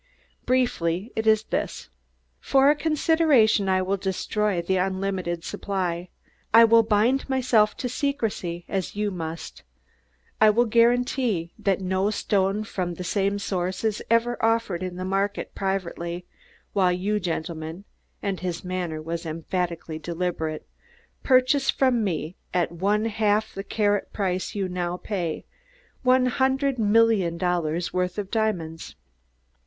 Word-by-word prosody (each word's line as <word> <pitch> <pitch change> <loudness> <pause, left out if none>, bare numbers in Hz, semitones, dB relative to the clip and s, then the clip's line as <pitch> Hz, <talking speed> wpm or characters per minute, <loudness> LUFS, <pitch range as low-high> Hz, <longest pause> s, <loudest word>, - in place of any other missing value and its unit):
Briefly 210 -6 0
it 220 0 -1
is 220 0 +5
this: - - -3 0.5
For 275 +1 +4
a - - +2
consideration 300 -10 +3
I 185 0 +2
will 195 +2 0
destroy 195 +1 -1
the 185 +2 0
unlimited 185 -2 -2
supply. 180 -3 -3 0.4
I 230 +1 +8
will 230 0 +6
bind 225 +6 +1
myself 240 -5 +2
to 250 - -2
secrecy, 225 -10 -2
as 190 -1 -3
you 210 0 -1
must; 165 -2 -6 0.8
I 215 - +8
will 235 +3 +3
guarantee 235 -5 +2
that 195 -1 +1
no 190 +2 0
stone 200 -1 0
from 180 -4 -3
the 180 - -6
same 200 +2 0
source 185 -1 -2
is 215 -2 0
ever 230 +1 +1
offered 225 -6 +1
in 185 -1 -4
the 185 +1 -4
market 195 +2 -1
or - - -43
privately, 180 -2 -3 0.5
while 185 -3 +3
you 200 +4 0
gentlemen," 165 0 -4 0.4
and 195 -3 -2
his 180 -1 -4
manner 175 -4 -3
was 165 +1 -4
emphatically 165 0 -3
deliberate, 165 -2 -3 0.5
"purchase 265 +1 +3
from 255 -4 +2
me 170 -3 -2 0.2
at 175 -2 +1
one 200 +5 0
half 215 -1 +1
the 195 - -5
carat 205 -1 0
price 185 -2 -2
you 195 -2 -1
now 180 -1 -3
pay 180 -5 -3 0.6
_one 255 0 +4
hundred 265 +1 +1
million 210 -5 +3
dollars' 175 -2 -1
worth 180 0 -1
of 200 -2 -4
diamonds! 180 - -2
195 Hz, 140 wpm, -25 LUFS, 175-225 Hz, 0.8 s, I